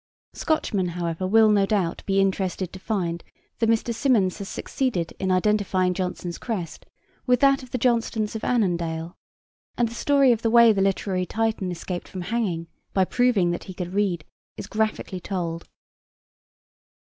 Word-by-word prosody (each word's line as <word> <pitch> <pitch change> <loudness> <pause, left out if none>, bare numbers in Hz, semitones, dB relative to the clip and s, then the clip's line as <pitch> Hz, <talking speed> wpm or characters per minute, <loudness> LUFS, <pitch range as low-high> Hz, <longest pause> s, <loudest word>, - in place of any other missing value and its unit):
Scotchmen, 205 - 0
however, 170 +1 -2
will, 220 +2 +5
no 200 -2 +3
doubt, 190 -6 0
be 195 0 +2
interested 190 -2 0
to 190 - -8
find 180 -5 -2 0.4
that 225 - +2
Mr. 230 +1 +1
Symonds 225 -6 +2
has 200 - -6
succeeded 210 -12 -2
in 190 - -1
identifying 185 -1 +2
Jonson's 180 -1 -4
crest 190 -9 -5 0.4
with 250 -1 +4
that 275 0 +5
of 255 - -12
the 255 - -2
Johnstones 230 -3 0
of 220 - -5
Annandale, 170 -7 -1 0.6
and 240 - +2
the 230 - -8
story 275 +1 +4
of 230 -2 +1
the 225 - +1
way 235 -1 +7
the 195 - 0
literary 190 -1 0
Titan 220 -4 -1
escaped 175 +1 -5
from 185 - -7
hanging, 180 -4 -2 0.3
by 190 -1 +4
proving 220 -6 +2
that 175 - -4
he 185 - -9
could 180 0 -5
read, 190 -6 0 0.3
is - - -6
graphically 215 -3 -2
told. 170 -3 -4
195 Hz, 160 wpm, -24 LUFS, 180-225 Hz, 0.6 s, way